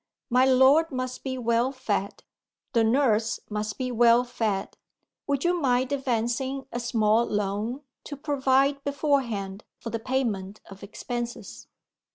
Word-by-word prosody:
My 250 +2 +5
lord 265 +5 +5
must 255 -1 -4
be 260 -1 -3
well 235 +1 +1
fed; 215 -7 -3 0.5
the 230 -2 +4
nurse 225 -2 +2
must 210 0 -3
be 255 -1 -2
well 240 0 +5
fed. 220 -5 -2 0.5
Would 280 -2 0
you 350 0 +1
mind 255 -1 +1
advancing 265 0 -1
a 240 - -3
small 225 -1 +2
loan, 210 +5 -2 0.2
to 285 - -7
provide 275 -1 +1
beforehand 250 -9 -1
for 230 - -7
the 230 - -2
payment 220 -6 -2
of 195 0 -12
expenses?" 240 +3 -6
245 Hz, 135 wpm, -26 LUFS, 220-265 Hz, 0.5 s, My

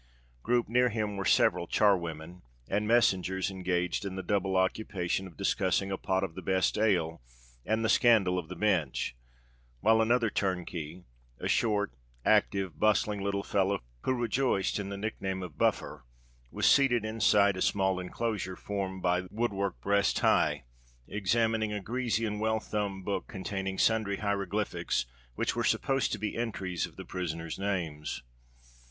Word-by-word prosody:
Grouped 120 - +1
near 125 +2 +3
him 105 -2 -2
were 95 -1 -3
several 85 - +3
char 105 +2 +4
women 85 0 -7 0.3
and 105 +2 0
messengers, 95 -5 +2
engaged 90 -1 -1
in 100 -2 -4
the 95 - -4
double 95 -1 0
occupation 95 -1 -1
of 90 - -15
discussing 95 0 +1
a - - 0
pot 95 0 0
of 90 -4 -3
the - - -7
best 95 -1 +1
ale 90 - +1 0.5
and 110 +1 +1
the - - +3
scandal 105 -6 +4
of 85 - -7
the - - -6
Bench; 90 - 0 0.6
while 110 +2 +4
another 115 -1 +2
turnkey—a 85 -11 -4
short, 105 - +1 0.3
active, 95 -6 +2
bustling 105 -1 +2
little 100 0 -1
fellow, 100 -1 +1 0.2
who 130 - 0
rejoiced 120 -4 0
in 100 -1 -4
the 100 - -5
nick 110 +2 -4
name 95 -1 -2
of 85 -5 -8
"Buffer"—was - - -3
seated 120 -5 +4
inside 105 -2 +3
a 90 - -5
small 95 -2 +1
enclosure 95 0 -3
formed 95 -2 -4
by 90 0 +1
wood 115 0 -1
work 100 -1 -2
breast 100 0 +2
high, 75 -2 +2 0.4
examining 110 +1 +1
a 105 - -2
greasy 115 +1 -1
and 105 -1 -3
well 110 0 +1
thumbed 100 -3 -3
book 100 - -2
containing 95 0 -4
sundry 110 -3 +2
hieroglyphics 100 -9 -1 0.3
which - - -1
were - - 0
supposed 135 -1 +1
to - - -1
be 105 0 -3
entries 95 -6 -2
of - - -18
the - - -8
prisoners' 85 -2 -4
names. 85 -10 -3
100 Hz, 155 wpm, -30 LUFS, 90-110 Hz, 0.6 s, char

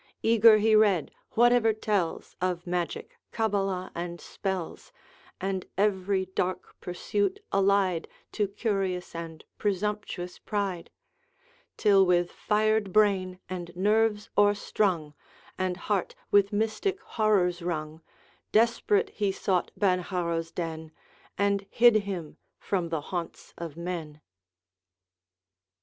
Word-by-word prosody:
Eager 225 -1 +7
he 215 +1 +4
read 200 -7 +3 0.2
whatever 240 -1 +4
tells 205 -5 -2
Of 180 -1 -1
magic, 175 -1 -3
cabala, 195 -4 -1
and 175 0 -5
spells, 190 -4 -5 0.5
And 190 -1 -3
every 195 -1 +1
dark 185 0 -3
pursuit 190 +2 -1
allied 195 -3 +2 0.2
To 210 -2 0
curious 195 -3 -2
and 165 -1 -7 0.2
presumptuous 200 -3 -2
pride; 200 -5 -3 0.9
Till 200 -2 +5
with 175 -1 +2
fired 215 -1 +1
brain 190 -3 +2
and 175 -2 -6
nerves 210 +2 +1
o'erstrung, 205 -6 +1 0.4
And 185 -1 -1
heart 200 -1 -2 0.2
with 200 -1 +4
mystic 220 - -1
horrors 205 - +1
wrung, 160 -2 -4 0.5
Desperate 400 - +2
he 205 -2 0
sought 185 -2 0
Benharrow's 175 -4 0
den, 160 -2 -5 0.5
And 200 0 +1
hid 240 -1 +6
him 190 -7 -4 0.2
from 180 -4 -2
the 160 -2 -2
haunts 175 +2 -6
of 165 -2 -7
men. 170 -4 -5
190 Hz, 105 wpm, -28 LUFS, 175-210 Hz, 0.9 s, Eager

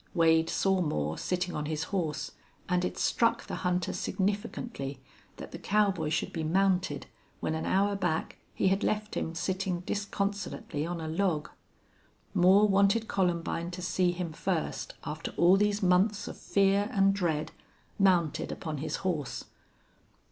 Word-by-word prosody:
Wade 165 -1 +4
saw 190 -1 +2
Moore 75 - -1
sitting 180 0 -2
on 150 0 -3
his 155 0 -2
horse. 160 -6 -1 0.4
And 180 -1 +1
it 180 - -2
struck 230 -1 +2
the - - -5
hunter 180 -1 0
significantly 195 - -2 0.4
that - - -8
the - - -7
cowboy 200 -6 +1
should 155 - -1
be 160 - -2
mounted 180 -2 +1 0.3
when 155 - -1
an 160 - -2
hour 200 +2 +2
back 175 -5 -2 0.2
he 190 - +3
had 195 +2 +1
left 210 0 -1
him 165 - -2
sitting 185 0 -1
disconsolately 200 -5 -3
on 175 0 -3
a 160 - -4
log. 160 -2 0 0.8
Moore 190 +2 +6
wanted 200 +3 +3
Columbine 170 -2 0
to 180 0 -6
see 180 0 +2
him 175 -2 -4
first, 170 0 -2
after 155 +2 -5
all 175 +2 +6
these 205 0 +1
months 190 +3 +3
of - - -6
fear 200 +1 +2
and 195 -3 +4
dread, 165 -6 -1 0.5
mounted 180 -5 +2
upon 155 -3 -4
his 155 - -2
horse. 155 -8 -2
180 Hz, 150 wpm, -30 LUFS, 160-195 Hz, 0.8 s, Moore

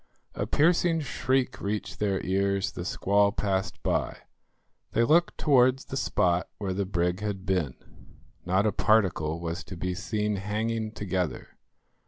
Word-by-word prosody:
A - - -3
piercing 165 +1 +3
shriek 130 -2 -1
reached 105 +1 -3
their 100 -2 0
ears, 100 +1 +1
the 90 - -6
squall 100 +1 +2
passed 95 -2 -2
by. - - 0 0.8
They 115 - +3
looked 170 +7 +3
towards 130 -2 +3
the - - -6
spot 90 -9 +1
where 100 -3 -2
the 95 0 -2
brig 90 -1 0
had 100 -2 -4
been. 90 -9 0 0.7
Not 95 +3 +1
a 110 - +3
particle 85 -9 +2
was 85 +2 -4
to 90 - -8
be 90 +1 -2
seen 105 +2 -2
hanging 110 +2 -2
together. 95 -7 -3
100 Hz, 145 wpm, -27 LUFS, 90-110 Hz, 0.8 s, piercing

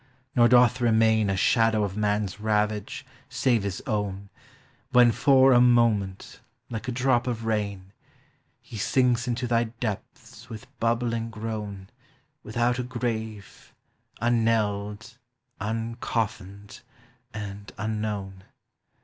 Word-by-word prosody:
nor 120 -2 +6
doth 125 0 +4
remain 110 -2 +3
A 95 - 0
shadow 110 +2 +3
of 100 -2 -3
man's 105 -2 -1
ravage, 105 -1 -1 0.2
save 120 -4 +1
his 100 -2 -4
own, 100 -2 -3 0.6
When, 120 -1 +6
for 135 +2 +5
a 120 - +6
moment, 115 -6 +2 0.3
like 115 +2 -5
a - - -1
drop 125 0 +1
of 115 -2 -3
rain, 100 -3 -3 0.7
He 110 - -10
sinks 125 +2 +1
into 125 +1 -1
thy 120 -1 +1
depths 110 -2 -7
with 110 +2 -8
bnbbl 115 -3 -2 0.3
",. 140 +3 -40
Without 120 +1 0
a - - -1
grave, 110 -4 -5 0.4
unknelled, 110 -1 0 0.4
uncofflned, 110 -2 -4 0.5
and 105 -1 -7
an 110 0 -3
known. 95 -3 -5
110 Hz, 115 wpm, -26 LUFS, 105-120 Hz, 0.7 s, nor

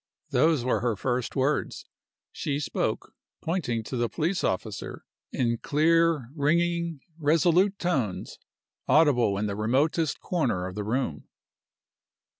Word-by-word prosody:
Those 155 -6 +3
were 125 -4 +1
her 115 0 0
first 125 +3 -2
words. 140 +3 -1 0.5
She 145 -1 -2
spoke 150 - -2 0.3
(pointing 140 -10 -2
to 130 - -6
the 120 -1 0
police 170 +4 -1
officer) 100 +2 -3 0.3
in 115 -2 0
clear, 160 -3 +2
ringing, 170 +1 0 0.2
resolute 170 +6 +3
tones, 135 - -2 0.5
audible 130 -10 +4
in 105 - -1
the 100 -1 -2
remotest 140 +8 +1
corner 125 - -1
of 95 - -5
the 105 +2 -4
room. 110 - -2
140 Hz, 120 wpm, -27 LUFS, 115-165 Hz, 0.5 s, audible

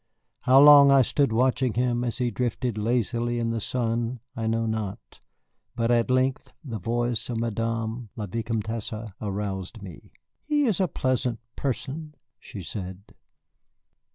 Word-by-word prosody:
How 130 +1 +5
long 145 -1 +9
I 135 -1 +6
stood 140 +1 +1
watching 125 +1 +1
him 120 0 +1
as 120 -2 -2
he 125 -2 0
drifted 120 +1 -2
lazily 120 +2 0
in 115 -1 0
the 115 -1 -2
sun 120 +1 -1 0.2
I 115 -1 -2
know 115 0 0
not, 110 -3 -4 0.6
but 115 0 +1
at 120 0 +2
length 130 +1 +1
the 115 -7 -5
voice 120 +3 -1
of 115 -2 -2
Madame 115 0 -2
la 110 - -4
Vicomtesse 110 +1 -4
aroused 100 0 -4
me. 90 -4 -11 0.3
"He 295 -1 +1
is 215 -7 +1
a 190 - +3
pleasant 125 -5 -1 0.2
person," 150 +3 -4 0.2
she 100 - -9
said. 95 +1 -7
115 Hz, 145 wpm, -26 LUFS, 110-125 Hz, 0.6 s, long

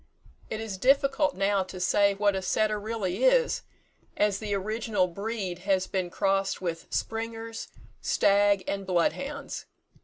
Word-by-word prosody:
It 215 - -3
is 215 -4 -5
difficult 275 +4 +3
now 195 +1 +2
to 185 0 -8
say 200 +2 +3
what 205 0 +2
a 190 - -1
setter 215 +2 +1
really 210 - -2
is, - - +4 0.6
as 205 -2 +2
the 215 -2 -5
original 215 0 0
breed 195 0 -4
has 190 0 +1
been 185 -2 -2
crossed 195 +1 0
with 170 -3 -4
springers, 225 0 -4 0.3
stag 200 -1 +3
and 195 -1 -3
blood 175 -2 +3
hounds. 285 +1 -6
205 Hz, 145 wpm, -28 LUFS, 190-225 Hz, 0.6 s, is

